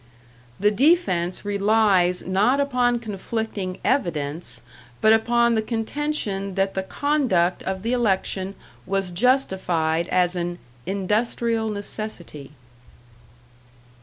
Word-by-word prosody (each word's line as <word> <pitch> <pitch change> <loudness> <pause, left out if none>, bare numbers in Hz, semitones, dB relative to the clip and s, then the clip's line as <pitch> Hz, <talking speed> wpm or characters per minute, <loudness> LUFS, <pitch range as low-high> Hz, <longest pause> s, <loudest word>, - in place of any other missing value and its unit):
"The 205 +2 +3
defence 210 - +2
relies 200 -3 +2
not 210 +9 +2
upon 250 -3 +2
conflicting 215 -3 -4
evidence, 170 - -2 0.4
but 220 - +5
upon 235 +1 +3
the 220 - +2
contention 220 -4 -2
that 195 0 0
the 190 - -1
conduct 225 - +1
of 190 0 -4
the 230 +2 0
election 195 -4 0 0.3
was 195 -2 -1
justified 175 -7 +1
as 180 0 +1
an 175 0 -3 0.3
'industrial 220 +3 0
necessity.' 205 -8 -6
205 Hz, 100 wpm, -23 LUFS, 185-235 Hz, 0.4 s, but